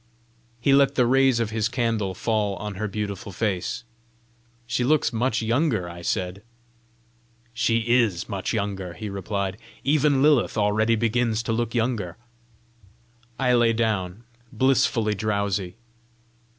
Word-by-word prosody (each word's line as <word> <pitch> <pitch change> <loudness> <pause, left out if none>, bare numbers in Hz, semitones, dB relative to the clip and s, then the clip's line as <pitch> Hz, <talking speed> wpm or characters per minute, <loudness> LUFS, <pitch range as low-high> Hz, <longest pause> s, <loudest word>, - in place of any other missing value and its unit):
He 135 +4 +3
let 140 0 +4
the 125 - +4
rays 130 0 +3
of 115 -2 -1
his 110 0 0
candle 115 -6 -1
fall 105 -1 0
on 105 +1 -5
her 105 +3 -3
beautiful 100 -1 -5
face. 100 +3 -2 0.8
"She 120 +1 -1
looks 145 0 +2
much 115 0 0
younger!" 115 - +1
I 85 0 -9
said. 90 +2 -2 1.1
"She 115 0 +1
IS 115 -7 +2
much 100 -3 -3
younger," 100 -5 -3
he 105 +5 -6
replied. 100 0 -3 0.3
"Even 145 -1 +3
Lilith 145 -7 +3
already 110 +2 +2
begins 115 0 0
to 115 - -1
look 115 +1 -2
younger!" 115 -7 -1 1.2
I 125 -2 +2
lay 120 -1 +4
down, 110 -3 -1 0.3
blissfully 120 -4 +2
drowsy. 100 -3 -1
110 Hz, 130 wpm, -24 LUFS, 100-120 Hz, 1.2 s, let